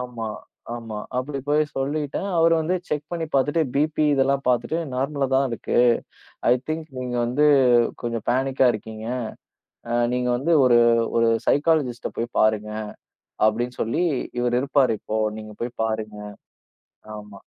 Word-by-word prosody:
ஆமா 120 -3 -5 0.5
ஆமா 115 -2 -7 0.2
அப்படி 140 +2 -3
போய்ச் 150 +1 +1
சொல்லிட்டேன். 145 +5 -2
அவரு 165 0 +5
வந்து 165 +4 0
செக் 150 -1 -2
பண்ணி 165 -1 -2
பாத்துட்டு 145 +4 +2
பிபி 155 +2 +1
இதெல்லாம் 135 0 +2
பாத்துட்டு 125 +6 +1 0.2
நார்மலாதான் 135 0 +1
இருக்கு. 115 - -1 0.7
ஐ - - +7 0.2
திங்க், 155 0 -3
நீங்க 125 -1 -3
வந்து 140 +5 +2 0.6
கொஞ்சம் 115 -2 -3
பேனிக்கா 130 +1 +2
இருக்கீங்க. 110 +1 -7 0.8
அ, 120 - -1 0.2
நீங்க 125 0 0
வந்து 165 +6 +1
ஒரு 120 -2 +5 0.4
ஒரு 115 0 +4 0.2
சைகலிஸ்ட்டா 145 -5 +1
போய் 115 +1 -3
பாருங்க 105 -1 +2 0.8
அப்படின்னு 120 +3 -3
சொல்லி 115 +11 0 0.4
இவரு 120 0 +1
இருப்பாரு. 135 -4 +2
இப்போ 110 - -3 0.2
நீங்கப் 110 -1 -11
போய்ப் 120 -1 -5
பாருங்க. 110 -1 -3 1.0
ஆமா. 105 -1 -11
125 Hz, 135 wpm, -23 LUFS, 115-145 Hz, 1.0 s, ஐ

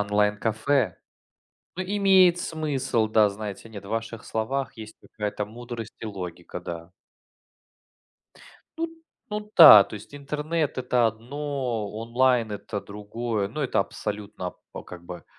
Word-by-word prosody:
онлайн-кафе? 105 +3 +1 0.8
Ну, 185 - -1
имеет 190 -2 +5
смысл, 145 -9 -1
да. 110 -1 +5
Знаете, 105 +1 -7
нет, 105 -3 -9
в - - -10
ваших 115 +1 -4
словах 130 +5 -2
есть 110 -1 -10
какая-то 105 -1 -4
мудрость 115 0 -8
и - - -5
логика, 90 -3 -6
да. 85 -1 -7 1.9
Ну 330 - 0 0.4
ну 210 0 -4
да, 110 - +12
то - - -10
есть 105 +6 -10
интернет- 150 +2 -2
это 125 -1 +2
одно, 125 -1 -3
онлайн- 115 +1 +2
это 105 0 -5
другое. 105 +1 -3
Ну, 135 +9 -5
это 135 - 0
абсолютно, 100 -2 -3 0.2
п - - -7
как 90 -1 -11
бы 90 0 -8
110 Hz, 130 wpm, -26 LUFS, 105-140 Hz, 1.9 s, да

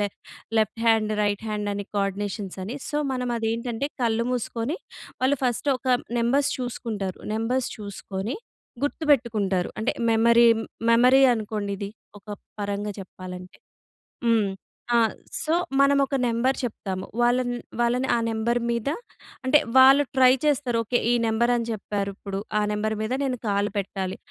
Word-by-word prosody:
Left 205 -1 -3 0.4
left 220 +1 0
hand, 220 -1 +3
right 205 +1 -1
hand 210 -1 -2
అని 200 0 -4
coordinations 195 0 -2
అని. 230 +8 -5
So, 295 - -2 0.2
మనమదేంటంటే, 235 +1 -2
కళ్ళు 230 0 +1
మూసుకొని, 245 - -2 0.4
వాళ్ళు 265 +2 +2
ఫస్ట్ 250 +3 +1
ఒక 260 - -15 0.3
నెంబర్స్ 270 +5 +2
చూసుకుంటారు. 225 -6 -4
నెంబర్స్ 240 +3 0
చూసుకొని, 200 - -5 0.5
గుర్తుపెట్టుకుంటారు. 225 - +1
అంటే, 220 - 0 0.2
మెమరీ, 235 +1 +5 0.4
మెమరీ 250 +3 +6
అనుకోండిది, 205 -2 -4 0.3
ఒక - - -54 0.3
పరంగా 205 +1 -2
చెప్పాలంటే. 180 -1 -9 0.7
హ్మ్ 220 -4 +3 0.4
ఆ! - - +6 0.4
సో, 315 - 0 0.3
మనమొక 275 0 +3
నంబర్ 240 +3 +1
చెప్తాము. 190 -6 -4 0.2
వాళ్ళన్ 245 +1 +2 0.3
వాళ్ళని 245 +2 +1
ఆ - - +2
నంబర్ 230 +2 0
మీద 235 +2 -1 0.6
అంటే, 295 +3 +6 0.2
వాళ్ళు 270 +2 +8
ట్రై 255 -1 +7
చేస్తారు. 270 -5 +1
ఓకె, 245 +3 +1
ఈ - - +4
నంబర్ 235 +2 +2
అని 235 -1 -2
చెప్పారిప్పుడు, 200 -1 -4 0.2
ఆ - - +1
నంబర్ 215 +1 -1
మీద 220 +3 -2
నేను 255 -3 -1
కాలు 205 +1 +1
పెట్టాలి. 190 -1 -4
225 Hz, 130 wpm, -25 LUFS, 205-250 Hz, 0.7 s, వాళ్ళు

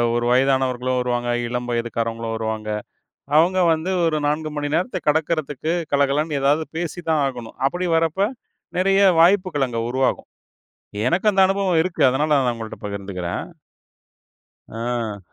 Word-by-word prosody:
ஒரு 120 0 0
வயதானவர்களும் 130 -1 +2
வருவாங்க, 120 -1 -1 0.2
இளம் 125 0 -3
வயதுக்காரங்களும் 115 -1 -2
வருவாங்க. 110 -1 -3 0.7
அவங்க 180 +4 +3
வந்து 160 +3 -2
ஒரு 160 -2 +1
4 155 +1 -1
மணி 145 0 -2
நேரத்தக் 185 0 -3
கடக்குறதுக்குக் 160 +1 0
கலகலன்னு 140 +2 +1
ஏதாவது 145 +3 +3
பேசித்தான் 165 -2 -1
ஆகணும். 120 -4 -6
அப்படி 175 +6 -2
வர்றப்ப, 165 +6 +1 0.5
நெறைய 195 +1 +3 0.2
வாய்ப்புகள் 175 -5 +3
அங்க 115 -1 -3
உருவாகும். 130 +1 0 0.8
எனக்கு 185 +7 +2
அந்த 195 - +4
அனுபவம் 195 -3 +1
இருக்கு, 180 -1 -4
அதனால 150 +4 0
நான் 125 -3 +1
உங்கள்ட்ட 115 -1 -8
பகிர்ந்துக்கிறேன். 95 -3 -4 1.2
ஆ. 115 -2 -3
140 Hz, 125 wpm, -22 LUFS, 120-165 Hz, 1.2 s, அந்த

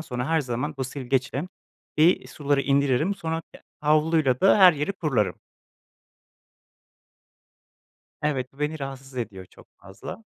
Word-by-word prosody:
sonra 125 -4 -4
her 160 -1 +2
zaman 130 +4 -3
bu 130 - -1
silgeçle 135 +1 -2 0.5
bir 165 +4 +4
suları 145 -2 0
indiririm, 140 +6 +2
sonra 165 -3 -3
ya - - -13 0.2
havluyla 150 -3 +2
da 195 - +5
her 185 -2 +9
yeri 150 +6 -2
kurularım. 135 - -1 2.8
Evet, 135 -4 -1
bu 135 - -24
beni 150 +1 -2
rahatsız 135 -1 -8
ediyor 100 -6 -5
çok - - -19
fazla. 100 - -10
140 Hz, 125 wpm, -25 LUFS, 130-160 Hz, 2.8 s, her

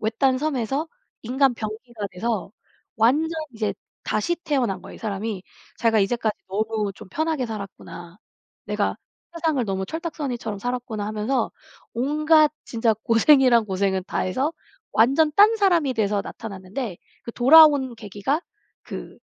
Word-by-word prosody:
외딴 255 +4 +1
섬에서 280 +1 -1 0.3
인간 260 +2 +2
병기가 220 0 -6
돼서 215 +1 -3 0.4
완전 260 +8 +3 0.2
이제 215 -2 -2 0.3
다시 215 +12 0
태어난 255 - -1
거예요 - - -11
이 - - -12
사람이. 210 -2 -4 0.4
자기가 225 -1 +3
'이제까지 215 +1 0
너무 215 +1 -1
좀 190 - -12
편하게 315 - -1
살았구나.' 195 -5 -8 0.5
'내가 - - -1 0.4
세상을 320 -6 0
너무 190 -2 -2
철딱서니처럼 275 - -4
살았구나.' 245 -3 -3
하면서 215 +5 -1 0.4
온갖 305 +4 +3
진짜 225 -1 +1
고생이란 240 0 +5
고생은 190 -1 -1
다해서 260 - -1 0.4
완전 275 +7 +4
딴사람이 395 -8 +4
돼서 205 -3 0
나타났는데 200 0 -6 0.3
그 235 - -6
돌아온 280 -1 +6
계기가 215 - -2 0.4
그 - - -8
235 Hz, 310 characters per minute, -23 LUFS, 210-285 Hz, 0.5 s, 돌아온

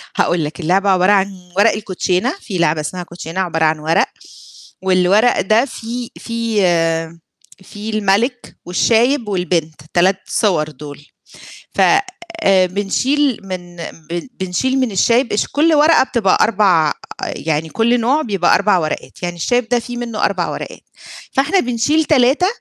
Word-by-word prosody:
هاقول 175 -3 +1
لك، 150 - -7
اللعبة 190 +4 +1
عبارة 185 +1 +3
عن 190 -3 -1
ورق 210 +3 +5
الكوتشينة، 195 +3 -1
في 195 -5 -5
لعبة 155 -2 +1
اسمها 180 +4 -5
كوتشينة 170 +1 -7
عبارة 165 -3 0
عن 155 0 +1
ورق 160 +2 +2 0.8
والورق 190 +5 +3
ده 215 +6 +3
فيه 240 -1 -6
فيه 170 -8 -1 0.4
فيه 210 +3 -8
المَلِك 215 +5 0
والشايب 230 +6 +2
والبنت 175 -5 -2
3 185 +3 +3
صور 155 -8 0
دُول، 145 0 -11 0.7
ف - - -1 0.6
آآ 190 - +4
بنشيل 250 +8 0
من 180 -2 -7 0.3
ب 175 +7 -4
بنشيل 225 +9 -1
من 255 -4 0
الشايب 235 +6 +2
اش 210 - +1
كل 315 +2 +2
ورقة 305 +2 +5
بتبقى 230 -8 +1
4 190 -8 +3 0.3
يعني 160 0 -3
كل 235 +6 +1
نوع 265 +7 +1
بيبقى 195 - +1
4 200 -1 +3
ورقات، 155 +2 -5
يعني 175 -1 -3
الشايب 245 +7 0
ده 245 - +2
في 245 +1 -8
منّه 235 -3 -3
4 185 -4 0
ورقات، - - -7 0.5
فإحنا 300 +8 +2
بنشيل 250 +5 +1
3 275 +4 +3
195 Hz, 145 wpm, -17 LUFS, 175-240 Hz, 0.8 s, ورق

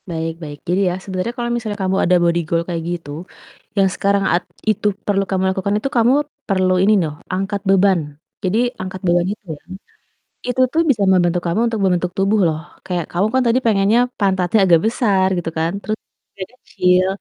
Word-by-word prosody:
Baik 165 -1 -3
baik 145 -2 -7
jadi 180 +3 +1
ya 180 - -2
sebenernya 185 +2 -3
kalo 240 -1 -2
misalnya 220 -3 -3
kamu 190 0 0
ada 180 +1 +4
body 170 0 +2
goal 170 0 0
kayak 170 -2 -3
gitu, 170 -4 -5 0.7
yang 195 - +5
sekarang 195 +1 +1
at 180 - +2 0.2
itu 215 -1 +1 0.2
perlu 200 -1 +1
kamu 190 0 +1
lakukan 200 +2 -1
itu 245 +6 -2
kamu, 235 +2 +4 0.4
perlu 185 -1 +2
ini 205 +3 +4
noh, 160 -5 -1
angkat 195 +2 -2
beban 195 -1 +4 0.4
jadi 190 +3 0 0.2
angkat 185 0 -6
beban 175 0 +3
itu 210 - -17
ya, 145 - -12 0.9
itu 250 +1 -1
tuh 330 - +3
bisa 220 -7 +2
membantu 175 -2 +3
kamu 170 +6 0
untuk 225 -2 -2
membentuk 180 -2 +1
tubuh 195 +3 +2
loh 155 -2 0 0.3
kayak 175 -4 -2
kamu 180 +4 +1
kan 260 - +3
tadi 235 +2 +3
pengennya 210 +1 +3 0.2
pantatnya 190 0 +2
agak 170 -3 +5
besar 205 -5 +2
gitu 170 -1 -3
kan, 165 +1 +1
terus 215 0 -3 0.4
dada 190 +5 -7
kecil 180 0 +2
190 Hz, 190 wpm, -19 LUFS, 175-205 Hz, 0.9 s, yang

